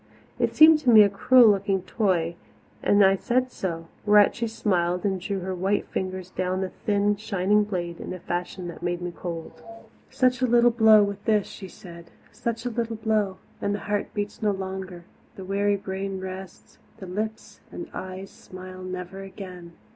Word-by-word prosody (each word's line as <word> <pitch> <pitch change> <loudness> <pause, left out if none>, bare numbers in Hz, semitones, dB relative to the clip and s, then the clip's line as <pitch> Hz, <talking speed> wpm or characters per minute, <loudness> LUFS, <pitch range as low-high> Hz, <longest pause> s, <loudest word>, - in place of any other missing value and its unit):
It - - 0
seemed 315 0 +8
to 275 -5 0
me 220 -3 +9
a 200 - +3
cruel 235 +3 +6
looking 195 -2 0
toy 180 -5 0 0.5
and 205 -1 +5
I 195 0 +4
said 255 +4 0
so 165 -6 -4 0.2
whereat 210 -1 +5
she 235 0 -2
smiled 180 -5 0
and 190 -2 0
drew 195 +1 -3
her 185 +1 -3
white 190 +3 0
fingers 185 -1 -4
down 185 0 -2
the 190 - -2
thin, 205 +2 0
shining 210 0 +1
blade 175 -4 -4
in - - -6
a 185 - -4
fashion 175 +1 -4
that 170 - -10
made 175 0 -2
me 175 0 -4
cold. 170 -2 -7 0.5
"Such 255 -1 +1
a 255 - +3
little 240 0 +5
blow 220 -2 +6
with 200 0 -4
this," 210 -3 +2
she 195 - -9
said, 170 -2 -13 0.2
"such 230 0 -4
a 245 - -1
little 230 0 -2
blow 215 -3 0 0.2
and 205 - 0
the - - -4
heart 205 0 -2
beats 205 +2 -4
no 215 - +2
longer, 190 -2 -5 0.3
the 190 - -8
weary 200 +1 +1
brain 195 0 -4
rests, 185 -1 -9 0.2
the 190 - -9
lips 215 +4 -5
and 345 - -7
eyes 185 +1 -7
smile 185 0 -11
never 185 +1 -6
again! 185 -3 -10
195 Hz, 185 wpm, -25 LUFS, 185-215 Hz, 0.5 s, me